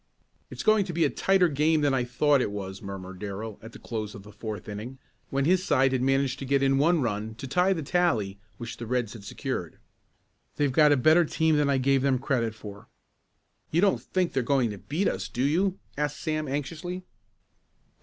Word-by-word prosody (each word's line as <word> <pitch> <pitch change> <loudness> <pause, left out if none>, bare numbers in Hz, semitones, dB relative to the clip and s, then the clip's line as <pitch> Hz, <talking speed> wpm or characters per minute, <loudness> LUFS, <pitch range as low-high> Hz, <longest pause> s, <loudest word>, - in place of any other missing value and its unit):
"It's - - -6
going 215 -1 +4
to 180 - -5
be 165 -1 +2
a 145 - +1
tighter 190 -2 +3
game 155 +1 +2
than 145 -2 +2
I 125 -2 +1
thought 145 +2 +2
it - - 0
was," 95 -1 -6
murmured 95 -2 -7
Darrell, 105 +1 -6
at 115 - -10
the - - -11
close 110 -3 -5
of 100 - -10
the 105 - -13
fourth 110 -1 -7
inning, 110 +5 -6 0.3
when 135 0 0
his 185 +3 +3
side 135 -6 +3
had 130 -1 0
managed 135 0 +1
to 135 - -5
get 140 +1 +2
in 135 0 +3
one 160 0 +3
run 110 -1 -3
to 135 - -7
tie 180 +8 +2
the 165 -4 -4
tally 125 - 0 0.2
which 115 -1 -7
the 120 - -7
Reds 120 -3 -1
had 110 -4 -10
secured. 100 - -5 0.8
"They've 145 -2 +1
got 150 +2 +5
a 145 - +5
better 155 +7 +5
team 160 0 +1
than 145 -1 +2
I 140 - +3
gave 135 +1 +2
them 135 -1 +2
credit 120 -4 -1
for." 100 -2 -10 0.8
"You 165 - +2
don't 200 -1 +3
think 185 -2 -1
they're 135 - +1
going 125 -2 +1
to 100 - -8
beat 165 - -1
us, - - -2
do 125 - -2
you?" 185 +7 +1 0.2
asked 150 0 -2
Sam 155 -2 -2
anxiously. 165 +6 -4
135 Hz, 215 wpm, -27 LUFS, 115-155 Hz, 0.8 s, got